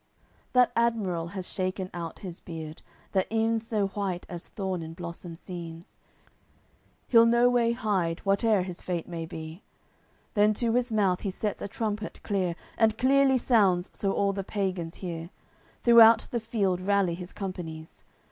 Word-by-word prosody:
CCLV - - -39
That 250 -1 +5
admiral 210 -8 0
has 185 0 -6
shaken 185 0 -3
out 170 -2 -6
his 175 -2 -6
beard 160 -2 -8 0.3
That 190 -2 +1
ev'n 225 0 +1
so 215 -3 -1
white 190 -3 -3
as 175 -2 -6
thorn 190 -3 -3
in 160 0 -7
blossom 170 0 -7
seems; 170 -1 -9 1.1
He'll 230 -1 +6
no 240 +1 +4
way 235 -1 +3
hide, 190 -8 0
whateer 200 0 +3
his 180 -1 -7
fate 175 -3 -3
may 165 -2 -5
be, 160 +2 -8 0.7
Then 210 0 +4
to 230 +1 0
his 245 0 +1
mouth 195 -4 +2
he 200 - -3
sets 205 +2 -3
a - - -3
trumpet 210 0 -4
clear, 185 -4 0 0.2
And 220 -1 +3
clearly 270 +1 +4
sounds, 200 -8 +3
so 195 - -1
all 200 0 +1
the 195 0 -3
pagans 185 -4 -3
hear. 165 -1 -5 0.5
Throughout 230 -1 +8
the 240 - 0
field 205 -5 0
rally 195 -2 +2
his 180 +1 -7
companies. 165 -5 -7
195 Hz, 160 wpm, -28 LUFS, 175-225 Hz, 1.1 s, Throughout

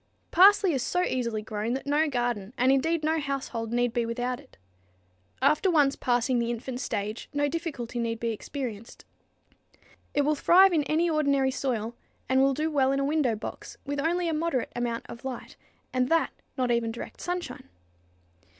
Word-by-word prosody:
_ - - -42
Parsley 385 0 +6
is 265 - 0
so 360 +8 0
easily 235 -8 -1
grown 215 +2 -3
that 265 - -4
no 295 +2 +2
garden, 240 -4 -2
and 255 +2 +4
indeed 315 +4 +1
no 320 +1 +1
household, 275 -6 -3
need 245 0 +1
be 240 -1 +1
without 245 +2 -2
it. 285 - -19 0.9
After 305 +7 +4
once 290 -5 +3
passing 245 0 +1
the 235 0 -1
infant 245 +2 -4
stage 215 -3 -4
no 290 0 +2
difficulty 280 -7 -4
need 230 -1 -2
be 230 0 -1
experienced. 230 -1 -6 1.1
It 290 - +3
will 300 +2 +2
thrive 365 +5 +6
in 315 - +3
any 325 +4 +2
ordinary 280 -4 +2
soil 235 -4 -2 0.3
and 260 0 +3
will 270 0 +3
do 310 +2 -1
well 270 -3 +3
in 275 - +1
a 275 - +1
window 285 -6 +1
box 215 - -8
with 285 +1 -3
only 340 +4 0
a 325 - 0
moderate 310 -5 -1
amount 240 -1 -2
of 235 - -10
light, 260 -2 -6 0.4
and 255 0 +1
that 330 0 +2 0.3
not 250 -2 +1
even 235 -1 +1
direct 235 - -8
sunshine. 350 - -5
265 Hz, 180 wpm, -27 LUFS, 235-305 Hz, 1.1 s, Parsley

